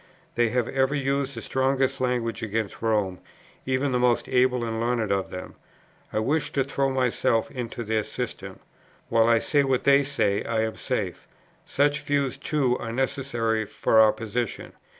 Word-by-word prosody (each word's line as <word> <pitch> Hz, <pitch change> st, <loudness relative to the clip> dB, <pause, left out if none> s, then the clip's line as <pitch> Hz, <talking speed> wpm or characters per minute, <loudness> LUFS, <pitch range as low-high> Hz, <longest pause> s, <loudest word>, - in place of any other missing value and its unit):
They 120 Hz, -1 st, +2 dB
have 125 Hz, 0 st, 0 dB
ever 135 Hz, +1 st, +1 dB
used 140 Hz, 0 st, -1 dB
the -, -, -6 dB
strongest 135 Hz, 0 st, 0 dB
language 125 Hz, -3 st, -1 dB
against 110 Hz, -1 st, -3 dB
Rome, 105 Hz, -5 st, 0 dB, 0.5 s
even 130 Hz, +1 st, +1 dB
the 125 Hz, -, +1 dB
most 125 Hz, -1 st, +2 dB
able 125 Hz, -1 st, +2 dB
and 115 Hz, -1 st, -3 dB
learned 115 Hz, -3 st, 0 dB
of 95 Hz, -1 st, 0 dB
them. 90 Hz, -, -7 dB, 0.6 s
I -, -, -3 dB
wish 145 Hz, +6 st, 0 dB
to 135 Hz, -, +2 dB
throw 135 Hz, 0 st, 0 dB
myself 125 Hz, -3 st, +1 dB
into 120 Hz, -2 st, -5 dB
their 110 Hz, 0 st, 0 dB
system. -, -, -6 dB, 0.5 s
While 115 Hz, 0 st, +4 dB
I 115 Hz, -, +5 dB
say 145 Hz, +5 st, +2 dB
what 135 Hz, -2 st, +1 dB
they 140 Hz, 0 st, +6 dB
say, 105 Hz, -7 st, 0 dB
I 115 Hz, -1 st, 0 dB
am 110 Hz, 0 st, -2 dB
safe. -, -, -3 dB, 0.4 s
Such 145 Hz, +1 st, +1 dB
views, 145 Hz, -2 st, 0 dB
too, 135 Hz, -3 st, 0 dB
are 115 Hz, -, -5 dB
necessary 120 Hz, -3 st, -1 dB
for 110 Hz, -, +2 dB
our 110 Hz, -1 st, +7 dB
position.' 115 Hz, +1 st, -4 dB
125 Hz, 170 wpm, -25 LUFS, 115-135 Hz, 0.6 s, our